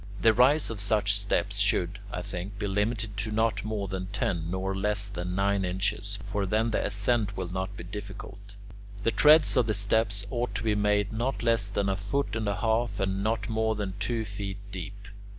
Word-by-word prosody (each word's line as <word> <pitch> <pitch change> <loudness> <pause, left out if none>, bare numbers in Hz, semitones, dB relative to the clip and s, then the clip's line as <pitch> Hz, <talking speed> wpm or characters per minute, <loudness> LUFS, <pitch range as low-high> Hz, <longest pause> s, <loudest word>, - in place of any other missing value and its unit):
The 115 -1 +5
rise 130 +4 +4
of 110 - -5
such 105 0 +3
steps 100 0 0
should, 100 -1 +1
I 90 - -4
think, 95 +4 -6
be 105 - -3
limited 105 +1 -1
to 110 +1 -2
not 110 -1 +1
more 105 -2 -2
than 95 0 -4
ten 90 -5 -2
nor 95 +1 -2
less 100 +1 0
than 90 -2 -4
nine 100 0 +1
inches; 100 +2 -1
for 100 -1 -2
then 110 +4 +1
the - - 0
ascent 105 0 0
will 90 -2 -3
not 95 +2 -3
be - - -7
difficult. 100 +1 -9 0.5
The 115 - +2
treads 150 +7 +6
of 120 -2 +3
the 110 - +1
steps 100 0 +2
ought 120 0 -2
to 110 - -2
be 110 -1 +2
made 105 0 +1
not 120 +3 -2
less 115 -3 +2
than 100 0 -1
a 95 - +1
foot 105 +8 -2
and 110 -2 -2
a 100 - 0
half, 110 +1 0
and 95 0 0
not 110 +2 -1
more 110 0 0
than 100 -3 -3
two 110 +1 -1
feet 100 -2 -5
deep. 100 +2 -7
105 Hz, 205 wpm, -28 LUFS, 100-110 Hz, 0.5 s, treads